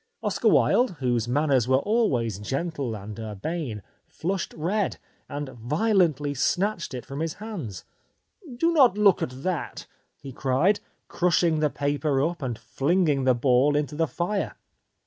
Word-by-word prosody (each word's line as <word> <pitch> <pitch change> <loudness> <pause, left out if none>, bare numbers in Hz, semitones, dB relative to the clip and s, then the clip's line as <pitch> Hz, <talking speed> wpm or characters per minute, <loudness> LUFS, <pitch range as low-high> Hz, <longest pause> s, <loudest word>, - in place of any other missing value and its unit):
Oscar - - 0
Wilde, 245 -7 +4
whose 120 -3 0
manners 135 -2 +2
were 130 0 +4
always 135 - +1
gentle 135 +1 -3
and 105 +1 -8
urbane, 110 - -4 0.2
flushed 185 +3 -3
red, 190 +6 -1 0.3
and 145 -1 -4
violently 150 - +1
snatched 175 +2 0
it 125 - -6
from 135 +1 -6
his 160 0 -2
hands. 180 - -7 0.4
" 305 - -15
Do 335 +6 +2
not 255 - +5
look 205 -3 +4
at 130 +2 -4
that! 180 -5 -3 0.2
" - - -47
he 135 - -7
cried, 140 - +2 0.3
crushing 170 -2 +2
the 150 -1 +2
paper 145 0 0
up 170 +4 -1
and 125 -4 -3
flinging 150 -1 +1
the 130 -1 +4
ball 130 +3 +3
into 150 0 -1
the 165 +1 +1
fire. 185 +6 -2
150 Hz, 150 wpm, -25 LUFS, 130-180 Hz, 0.4 s, not